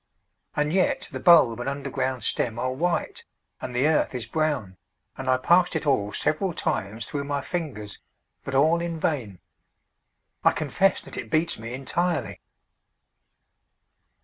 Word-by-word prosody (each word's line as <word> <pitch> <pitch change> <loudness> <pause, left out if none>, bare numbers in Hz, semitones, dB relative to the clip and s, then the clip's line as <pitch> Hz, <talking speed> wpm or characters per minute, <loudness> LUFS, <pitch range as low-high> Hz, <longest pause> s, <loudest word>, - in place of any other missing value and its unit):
And 150 +1 0
yet 185 -1 +1
the - - -5
bulb 145 -10 +6
and 120 - -2
underground 135 -2 -3
stem 115 -2 0
are 130 +2 -1
white, 170 +6 -1 0.4
and 125 - -5
the 130 +3 +2
earth 155 -4 +1
is 125 - -3
brown, 145 - -1 0.4
and 135 - -7
I 130 - +4
passed 175 +7 +3
it 160 - -1
all 115 -8 +1
several 175 - 0
times 110 +3 -2
through 140 -1 -4
my 140 0 -2
fingers, 135 - -5 0.4
but 135 - -4
all 160 +5 +4
in 170 -1 -3
vain. 120 - -2 1.1
I - - +5
confess - - +2
that - - -9
it 115 - -5
beats 155 +2 +1
me 115 +2 -6
entirely. 170 +6 -2
140 Hz, 145 wpm, -25 LUFS, 120-160 Hz, 1.1 s, bulb